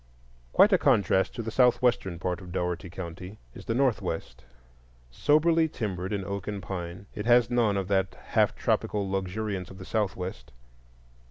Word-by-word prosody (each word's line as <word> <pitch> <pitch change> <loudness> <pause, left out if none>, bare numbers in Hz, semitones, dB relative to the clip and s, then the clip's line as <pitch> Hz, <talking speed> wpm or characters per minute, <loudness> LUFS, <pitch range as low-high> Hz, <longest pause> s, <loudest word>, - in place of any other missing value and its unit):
Quite - - +6
a - - +5
contrast 95 -1 +2
to 115 - -4
the 115 - -4
southwestern 125 -7 +2
part 90 +1 -3
of 90 -1 -10
Dougherty 90 0 -2
County 90 +3 -8 0.2
is - - -11
the 115 - -1
northwest. 110 - -1 0.7
Soberly 160 - +3
timbered 95 -7 -4
in 100 -2 -2
oak 100 0 -5
and 105 -1 -3
pine, 90 -1 -6
it 105 0 -5
has 120 -1 +5
none 115 -5 +2
of 95 -2 -2
that 95 -1 +1
half - - +2
tropical 100 -2 0
luxuriance 95 0 -3
of 95 - -11
the 95 - -9
southwest. 95 - -3
100 Hz, 160 wpm, -28 LUFS, 90-115 Hz, 0.7 s, Quite